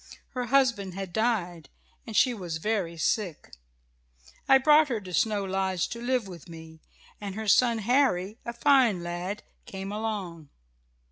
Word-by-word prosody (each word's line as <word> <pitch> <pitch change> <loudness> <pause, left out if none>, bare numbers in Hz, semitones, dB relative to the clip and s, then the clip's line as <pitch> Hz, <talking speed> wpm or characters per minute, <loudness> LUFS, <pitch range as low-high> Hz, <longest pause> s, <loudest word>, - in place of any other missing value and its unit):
Her 250 -1 -4
husband 235 -8 +1
had 190 -2 -6
died, 180 - -1 0.4
and 225 - -6
she 255 - +4
was 175 -7 -5
very 180 -2 -2
sick. 180 -1 -2 1.0
I 270 - +8
brought 300 +3 +5
her 240 -5 -2
to 185 -3 -10
Snow 210 +3 +1
Lodge 190 -2 -1
to 235 - -6
live 245 -3 0
with 175 -3 -11
me, 160 -1 -12 0.4
and 200 -2 -5
her 220 0 -5
son, 235 +3 +4
Harry, 220 -3 +1
a 235 - -4
fine 235 -7 +3
lad, 175 +4 -4 0.2
came 195 0 -6
along. 200 -8 -4
205 Hz, 150 wpm, -27 LUFS, 180-235 Hz, 1.0 s, I